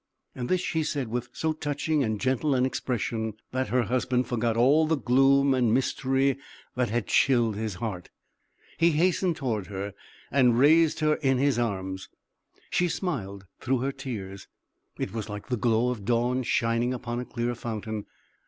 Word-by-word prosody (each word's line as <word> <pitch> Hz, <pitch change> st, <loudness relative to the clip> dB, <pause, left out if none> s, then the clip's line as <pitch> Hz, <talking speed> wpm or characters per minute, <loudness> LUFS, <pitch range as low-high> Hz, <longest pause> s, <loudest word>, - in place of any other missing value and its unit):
This 175 Hz, +9 st, -1 dB
she 160 Hz, -3 st, -1 dB
said 145 Hz, -5 st, -2 dB
with 120 Hz, +1 st, -3 dB
so 160 Hz, 0 st, -1 dB
touching 150 Hz, 0 st, -1 dB
and 110 Hz, -3 st, -1 dB
gentle 130 Hz, +3 st, +1 dB
an 125 Hz, 0 st, +3 dB
expression, 115 Hz, -4 st, -2 dB, 0.2 s
that 130 Hz, +1 st, -1 dB
her 125 Hz, 0 st, +2 dB
husband 125 Hz, +2 st, 0 dB
forgot 115 Hz, -1 st, -1 dB
all 145 Hz, +6 st, +4 dB
the 160 Hz, 0 st, +2 dB
gloom 135 Hz, +2 st, +4 dB
and 125 Hz, -4 st, +2 dB
mystery 135 Hz, +2 st, +1 dB, 0.4 s
that 125 Hz, -1 st, 0 dB
had 115 Hz, -1 st, -1 dB
chilled 120 Hz, -1 st, +3 dB
his 110 Hz, -2 st, -3 dB
heart; 90 Hz, -3 st, -5 dB, 0.7 s
he 170 Hz, 0 st, +4 dB
hastened 175 Hz, +2 st, +2 dB
toward, 115 Hz, -10 st, -2 dB
her 100 Hz, 0 st, -5 dB, 0.4 s
and 125 Hz, -4 st, +4 dB
raised 160 Hz, +4 st, +4 dB
her 155 Hz, 0 st, +3 dB
in 135 Hz, -3 st, +1 dB
his 135 Hz, -2 st, +2 dB
arms. 95 Hz, -4 st, -3 dB, 0.6 s
She 180 Hz, -, +2 dB
smiled 100 Hz, -, -4 dB
through 130 Hz, -1 st, 0 dB
her 135 Hz, +1 st, 0 dB
tears 110 Hz, -9 st, -7 dB, 0.5 s
it -, -, -4 dB
was 110 Hz, -1 st, -4 dB
like 105 Hz, +3 st, -7 dB
the 125 Hz, -, +1 dB
glow 120 Hz, +1 st, +2 dB
of 115 Hz, -5 st, -5 dB
dawn 120 Hz, +3 st, +1 dB
shining 120 Hz, +1 st, +1 dB
upon 120 Hz, -1 st, -4 dB
a -, -, -3 dB
clear 120 Hz, 0 st, -2 dB
fountain. 110 Hz, -2 st, -5 dB
125 Hz, 165 wpm, -27 LUFS, 115-140 Hz, 0.7 s, all